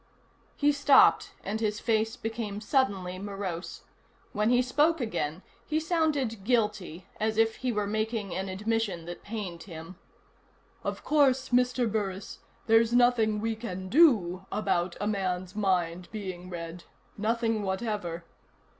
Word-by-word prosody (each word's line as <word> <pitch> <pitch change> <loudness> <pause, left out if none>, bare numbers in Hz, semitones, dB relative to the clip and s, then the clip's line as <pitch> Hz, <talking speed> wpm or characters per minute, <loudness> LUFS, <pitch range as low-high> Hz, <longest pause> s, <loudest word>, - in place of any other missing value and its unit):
He 290 0 +3
stopped, 285 -1 +5
and 215 +3 -3
his 210 -2 -1
face 220 -1 +1
became 225 -2 -4
suddenly 200 -7 0
morose. 195 -3 -5 0.5
When 210 +1 +1
he 245 +1 +4
spoke 300 +6 +2
again, 185 - -3 0.2
he 310 - +1
sounded 305 - 0
guilty, 210 -7 0
as 220 0 0
if 225 0 +3
he 255 -1 -1
were 210 -2 -1
making 215 -2 -2
an 190 +2 -3
admission 205 -3 -1
that 175 0 -7
pained 200 -6 -6
him. 165 0 -9 0.9
"Of - - -4
course, 270 -3 +3
Mr. 250 0 +2
Burris, 200 -3 -3 0.3
there's 225 +1 +4
nothing 240 -3 +4
we 225 0 -1
can 190 -5 -6
do 195 - +4
about 180 -4 0
a 205 - -2
man's 185 -2 -2
mind 180 -4 0
being 185 -4 -6
read. 170 0 -7 0.3
Nothing 225 +1 0
whatever." 190 -4 -3
210 Hz, 135 wpm, -28 LUFS, 185-230 Hz, 0.9 s, stopped